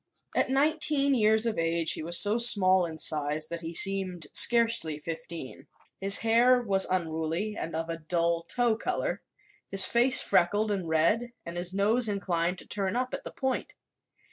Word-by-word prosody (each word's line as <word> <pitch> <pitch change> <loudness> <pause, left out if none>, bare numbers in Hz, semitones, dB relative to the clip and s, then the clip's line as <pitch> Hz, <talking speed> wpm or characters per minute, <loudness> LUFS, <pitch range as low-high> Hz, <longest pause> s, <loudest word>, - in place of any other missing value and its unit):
At - - 0
nineteen 280 0 +1
years 220 -2 +2
of 225 -6 -2
age 165 -1 0
he - - -4
was 170 +2 +3
so 210 +3 +5
small 190 -6 +6
in 160 -1 -9
size 150 0 +1
that 170 0 -7
he 165 0 -7
seemed 190 -4 -1
scarcely 230 -10 +3
fifteen. 160 -3 -9 0.3
His 195 +1 +2
hair 240 +3 +2
was 195 -5 0
unruly 170 +3 -3
and 165 -5 -6
of 165 0 -4
a 165 0 -5
dull 170 +1 -1
tow 235 +6 -1
color, 225 - -4 0.5
his 195 -1 +1
face 245 +3 +3
freckled 205 +5 0
and 190 -5 -4
red 210 +10 0
and 170 - -8
his 175 +1 -4
nose 215 +4 0
inclined 180 -3 -2
to - - -10
turn 195 -1 -4
up 255 +1 -3
at - - -5
the - - -6
point. 265 -1 -4
190 Hz, 170 wpm, -27 LUFS, 165-230 Hz, 0.5 s, small